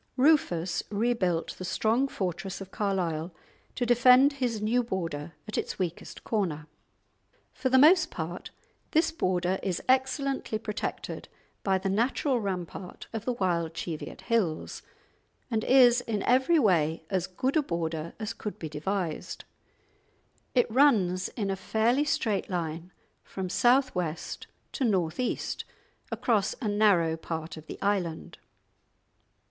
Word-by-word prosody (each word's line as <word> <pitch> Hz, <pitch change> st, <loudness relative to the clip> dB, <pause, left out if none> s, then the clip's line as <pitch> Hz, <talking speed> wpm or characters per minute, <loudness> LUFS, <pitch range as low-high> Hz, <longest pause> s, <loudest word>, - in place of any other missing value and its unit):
Rufus 190 Hz, -, +3 dB
rebuilt 205 Hz, -6 st, 0 dB
the -, -, -5 dB
strong 225 Hz, +8 st, +1 dB
fortress 190 Hz, -4 st, -4 dB
of 195 Hz, -1 st, -9 dB
Carlisle 175 Hz, -5 st, -2 dB, 0.4 s
to 245 Hz, -, 0 dB
defend 250 Hz, +3 st, +6 dB
his 245 Hz, -5 st, -1 dB
new 225 Hz, +4 st, +2 dB
border 165 Hz, -8 st, -4 dB
at 215 Hz, -, -2 dB
its -, -, -4 dB
weakest 175 Hz, -3 st, -4 dB
corner. 170 Hz, -9 st, -1 dB, 0.9 s
For 260 Hz, -, -1 dB
the 260 Hz, -, +5 dB
most 315 Hz, +4 st, +6 dB
part 175 Hz, +2 st, -5 dB, 0.4 s
this 320 Hz, +1 st, +3 dB
border 185 Hz, -, 0 dB
is 185 Hz, -3 st, -1 dB
excellently 265 Hz, -2 st, +1 dB
protected 215 Hz, -1 st, -5 dB, 0.3 s
by 190 Hz, -1 st, +2 dB
the 190 Hz, +1 st, -3 dB
natural 240 Hz, +6 st, +1 dB
rampart 185 Hz, -3 st, -5 dB
of 225 Hz, -1 st, -4 dB
the 250 Hz, -, 0 dB
wild 170 Hz, -6 st, -1 dB
Cheviot 160 Hz, -1 st, -5 dB
Hills, 210 Hz, -10 st, -1 dB, 0.7 s
and 220 Hz, -1 st, 0 dB
is 245 Hz, -2 st, +6 dB
in 215 Hz, -5 st, -2 dB
every 260 Hz, +7 st, +4 dB
way 165 Hz, -, +2 dB
as 185 Hz, -2 st, 0 dB
good 255 Hz, -, -2 dB
a 310 Hz, -, +5 dB
border 165 Hz, -, -3 dB
as 220 Hz, 0 st, -3 dB
could 210 Hz, -2 st, -6 dB
be 160 Hz, -, -6 dB
devised. 165 Hz, +2 st, -3 dB, 1.1 s
It 245 Hz, -, +5 dB
runs 205 Hz, -9 st, +3 dB
in 200 Hz, -3 st, -3 dB
a -, -, 0 dB
fairly 230 Hz, +8 st, +1 dB
straight 220 Hz, -8 st, 0 dB
line 170 Hz, -1 st, -3 dB, 0.3 s
from 190 Hz, -1 st, -5 dB
south 255 Hz, +6 st, +3 dB
west 165 Hz, -3 st, -4 dB, 0.2 s
to 275 Hz, -, -3 dB
north 185 Hz, -7 st, +1 dB
east, 250 Hz, -, -2 dB, 0.5 s
across 215 Hz, -4 st, +1 dB
a 240 Hz, -, -2 dB
narrow 205 Hz, -6 st, +3 dB
part 160 Hz, 0 st, -5 dB
of 155 Hz, -1 st, -12 dB
the -, -, -8 dB
island. 185 Hz, -5 st, -1 dB
200 Hz, 135 wpm, -28 LUFS, 175-245 Hz, 1.1 s, defend